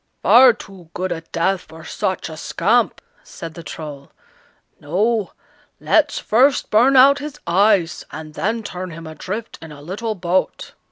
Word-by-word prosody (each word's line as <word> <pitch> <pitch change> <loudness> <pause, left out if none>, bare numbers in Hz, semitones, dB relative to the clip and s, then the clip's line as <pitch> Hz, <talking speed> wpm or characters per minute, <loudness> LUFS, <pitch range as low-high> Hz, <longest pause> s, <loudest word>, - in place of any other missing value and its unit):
"Far 240 +6 +7
too 190 -6 -13
good 185 +1 -3
a 165 -1 -3
death 170 +3 -1
for 160 +1 -14
such 185 +3 -3
a 160 - -8
scamp," - - 0 0.2
said 165 -1 -9
the 170 - -9
Troll. 150 -4 -9 0.7
"No! 205 +7 -1 0.5
let's 300 -2 +2
first 260 +6 +2
burn 245 +6 +4
out 280 +2 +7
his 295 0 -8
eyes, 190 -1 +2
and 155 0 -9
then 225 +7 -2
turn 185 -2 -6
him 165 0 -10
adrift 190 +8 -7
in 160 -1 -10
a 145 - -11
little 205 +9 -4
boat." 180 0 -2
185 Hz, 155 wpm, -20 LUFS, 165-225 Hz, 0.7 s, Far